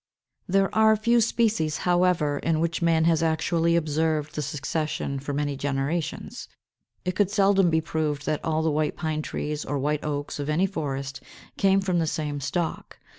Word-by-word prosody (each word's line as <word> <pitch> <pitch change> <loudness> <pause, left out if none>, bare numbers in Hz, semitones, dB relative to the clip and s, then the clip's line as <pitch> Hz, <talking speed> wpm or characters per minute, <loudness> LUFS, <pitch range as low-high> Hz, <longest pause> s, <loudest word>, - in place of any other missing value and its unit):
There 195 +1 +2
are 220 0 +5
few 235 +2 +3
species, 215 -9 +1
however, 175 -5 +2
in 160 -1 0
which 165 +1 -1
man 165 -1 +3
has 165 -1 +3
actually 165 +1 +1
observed 155 -1 0
the 150 - -2
succession 145 0 -3
for 140 +2 -5
many 145 0 -1
generations. 140 +4 -3 0.6
It 180 0 -1
could 200 -2 +2
seldom 195 -3 +3
be 160 0 +2
proved 155 -2 -2
that 155 -1 -1
all 160 0 0
the 160 - +2
White 155 +1 0
Pine 155 -2 -2
trees 150 0 -4
or 145 - -2
White 150 +2 -1
Oaks 145 -1 -3
of 145 +1 -3
any 160 +5 +2
forest 140 -6 -4 0.3
came 195 0 +3
from 185 -3 0
the 165 - 0
same 150 -2 -2
stock. 160 +5 -3
160 Hz, 175 wpm, -25 LUFS, 150-175 Hz, 0.6 s, are